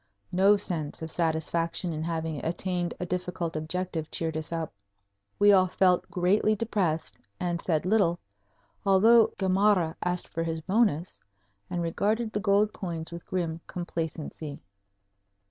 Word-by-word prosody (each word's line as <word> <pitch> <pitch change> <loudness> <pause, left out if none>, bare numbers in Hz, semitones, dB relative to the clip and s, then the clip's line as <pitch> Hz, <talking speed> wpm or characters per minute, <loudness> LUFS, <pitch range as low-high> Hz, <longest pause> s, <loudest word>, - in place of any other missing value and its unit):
No 195 +3 +5
sense 165 -6 -3
of 160 - -5
satisfaction 165 +1 0
in 155 - -4
having 160 -3 -3
attained 175 +1 -2
a 180 - -2
difficult 180 -2 -3
objective 160 0 -3
cheered 160 -1 -2
us 155 0 -4
up. 165 -6 -3 0.6
We 205 0 +6
all 185 -2 +6
felt 180 0 +2
greatly 200 +4 +2
depressed 195 -7 -1 0.2
and 175 -1 -1
said 160 -2 0
little, 185 -4 +3 0.7
although 220 +4 +6
Gamarra 190 -3 +3
asked 180 0 0
for 165 - -3
his 165 -1 -2
bonus 185 -2 +1 0.5
and 175 -1 -2
regarded 215 +7 0
the 210 - 0
gold 205 +1 +3
coins 170 -3 -5
with 170 0 -8
grim 170 -3 -2
complacency. 160 -4 -5
175 Hz, 135 wpm, -28 LUFS, 160-195 Hz, 0.7 s, We